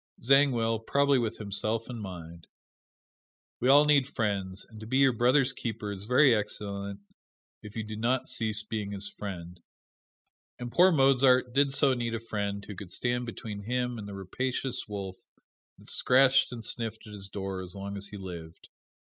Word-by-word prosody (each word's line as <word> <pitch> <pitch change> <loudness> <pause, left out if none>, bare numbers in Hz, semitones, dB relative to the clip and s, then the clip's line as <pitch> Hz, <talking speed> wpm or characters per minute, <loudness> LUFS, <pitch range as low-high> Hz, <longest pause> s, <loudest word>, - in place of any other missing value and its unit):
Zangwill, 120 -4 +3
probably 140 +4 +2
with 115 -3 -2
himself 110 +2 -2
in 120 -2 -6
mind. 85 -4 -9 1.1
We 125 - +1
all 145 +2 +7
need 145 -3 +4
friends 100 -6 -2
and 110 -2 -13
to 110 - -9
be 130 +3 +1
your 135 -2 +5
brother's 125 +3 +3
keeper 110 -4 -4
is 100 0 -6
very 125 +3 +5
excellent 100 -2 -3 0.6
if 105 -1 -11
you 110 - -2
do 110 0 -7
not 120 +4 0
cease 110 -4 -1
being 105 -2 -4
his 100 0 -5
friend. 90 -4 -8 1.0
And 120 -1 -6
poor 180 +6 +6
Mozart 135 -4 +4
did 140 +1 +3
so 135 0 +4
need 120 -2 -2
a - - -3
friend 100 -3 -4
who 105 - -7
could 90 0 -9
stand 120 +5 -1
between 110 -3 -6
him 125 +2 -2
and 100 - -7
the 100 - -7
rapacious 125 +7 -3
wolf 100 -3 -6 0.6
that - - -18
scratched 130 +1 +4
and 115 -3 -7
sniffed 115 -1 -2
at 105 - -11
his 100 -1 -5
door 95 -1 -4
as 90 +1 -6
long 100 +1 -5
as 100 0 -4
he 105 - -9
lived. 85 -4 -9
110 Hz, 175 wpm, -29 LUFS, 100-125 Hz, 1.1 s, all